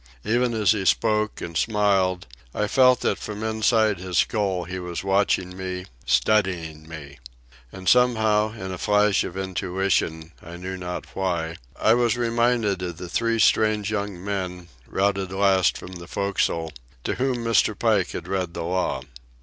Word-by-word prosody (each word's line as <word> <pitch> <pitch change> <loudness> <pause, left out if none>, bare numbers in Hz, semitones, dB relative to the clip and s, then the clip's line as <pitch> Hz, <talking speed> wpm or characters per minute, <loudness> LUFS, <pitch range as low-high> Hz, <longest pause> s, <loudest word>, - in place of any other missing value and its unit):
Even 120 +1 +1
as 105 -4 +3
he 105 -3 0
spoke 110 +2 +1
and 85 - -6
smiled 100 -3 +1 0.3
I 105 - +1
felt 125 +2 +4
that - - 0
from 105 0 -6
inside 110 -2 +2
his 90 -1 -3
skull 100 -5 +1
he 95 +2 -6
was 90 -1 -5
watching 95 -2 +1
me, 90 -1 -5 0.2
studying 85 -7 +1
me. 70 -3 -10 0.5
And 95 -1 -9
somehow, 110 -4 +3
in 95 -4 -7
a 90 - -6
flash 105 0 +3
of 90 - -6
intuition, 95 -3 -1
I 85 +1 -9
knew 95 +1 -5
not 90 -1 -6
why, 85 -3 -2 0.2
I 110 - +4
was 120 0 +2
reminded 115 -4 +1
of 90 -2 -4
the 90 0 -7
three 115 +3 0
strange 110 -1 +3
young 100 -3 -4
men, 90 -3 -4 0.2
routed 95 -1 0
last 95 -2 +3
from 90 - -9
the 85 -2 -9
forecastle, 85 -5 -1 0.3
to - - -1
whom 125 -2 -1
Mr. 115 -2 +2
Pike 110 -6 +1
had 85 - -6
read 90 -2 -2
the 85 - -3
law. 85 -6 -1
95 Hz, 160 wpm, -24 LUFS, 90-110 Hz, 0.5 s, felt